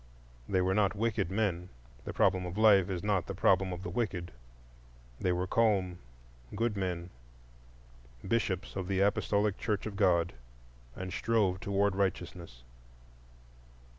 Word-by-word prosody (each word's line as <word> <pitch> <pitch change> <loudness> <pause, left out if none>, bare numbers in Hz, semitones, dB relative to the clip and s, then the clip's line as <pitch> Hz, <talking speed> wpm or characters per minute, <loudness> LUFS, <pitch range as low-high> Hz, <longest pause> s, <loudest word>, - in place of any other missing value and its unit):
They 95 -2 +2
were 95 +1 +1
not 100 0 +2
wicked 105 -4 0
men,—the 85 - -4
problem 95 -2 +2
of 90 +3 -7
life 100 -4 +5
is 90 -1 -3
not 100 -4 0
the - - -5
problem 95 0 +3
of 90 0 -6
the - - -4
wicked,—they - - -6
were 90 +1 0
calm, 95 -4 +1 0.6
good 115 0 0
men, 90 -2 -3 1.2
Bishops 95 -3 -1
of 95 -2 -3
the 95 0 0
Apostolic 100 0 +1
Church 105 -3 -1
of 105 -2 -5
God, 85 -2 +2 0.6
and 95 0 -6
strove 105 -5 +1
toward 100 0 +1
righteousness. 90 -9 -3
95 Hz, 130 wpm, -31 LUFS, 85-100 Hz, 1.2 s, life